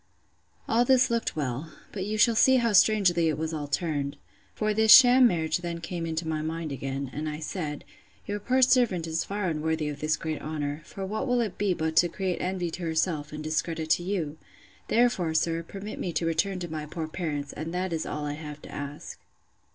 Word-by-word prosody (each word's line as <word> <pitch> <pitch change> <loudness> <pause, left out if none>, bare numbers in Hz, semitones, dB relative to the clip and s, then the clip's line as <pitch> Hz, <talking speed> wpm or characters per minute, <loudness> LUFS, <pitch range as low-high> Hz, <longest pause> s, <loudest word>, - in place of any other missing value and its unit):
All 230 +2 +3
this 260 0 +4
looked 230 -1 -1
well; 145 +1 -3 0.2
but 195 -1 -4
you 215 +1 -2
shall 230 +2 +5
see 260 +4 +5
how 235 -3 +2
strangely 185 -5 +4
it 150 - -1
was 160 +1 -3
all 150 -2 -4
turned. 145 -2 -2 0.4
For 215 0 0
this 220 0 +4
sham 250 +1 +9
marriage 160 -4 0
then 170 -1 -4
came 170 0 -4
into 160 0 -3
my 155 -1 -1
mind 160 0 -4
again; 135 0 -4
and 155 +1 -3
I 150 - -4
said, 155 -2 -4 0.4
Your 205 0 -3
poor 255 +5 +2
servant 245 -10 +3
is 160 0 -1
far 200 -1 -3
unworthy 160 -1 -1
of 145 -1 -6
this 155 +1 0
great 155 -1 -4
honour; 150 -1 -4
for 195 +2 -6
what 215 +6 -3
will 245 -1 +2
it 220 -5 -2
be 200 -3 +1
but 160 0 -2
to 175 - +5
create 185 0 -2
envy 180 -2 -2
to 180 - -7
herself, 160 -2 -1
and 150 0 -6
discredit 160 0 -2
to 175 - +4
you? 175 -5 -3 0.5
Therefore, 215 -9 +2
sir, 165 +1 +1
permit 200 +5 -8
me 175 - -2
to 165 - -1
return 175 +4 0
to 175 - -3
my 155 -1 -4
poor 160 0 -4
parents, 150 -4 -4
and 160 +2 -5
that 180 0 -2
is 160 - -1
all 150 0 -4
I 145 - -2
have 150 -1 -8
to - - -10
ask. 145 +1 -7
165 Hz, 215 wpm, -27 LUFS, 155-195 Hz, 0.5 s, sham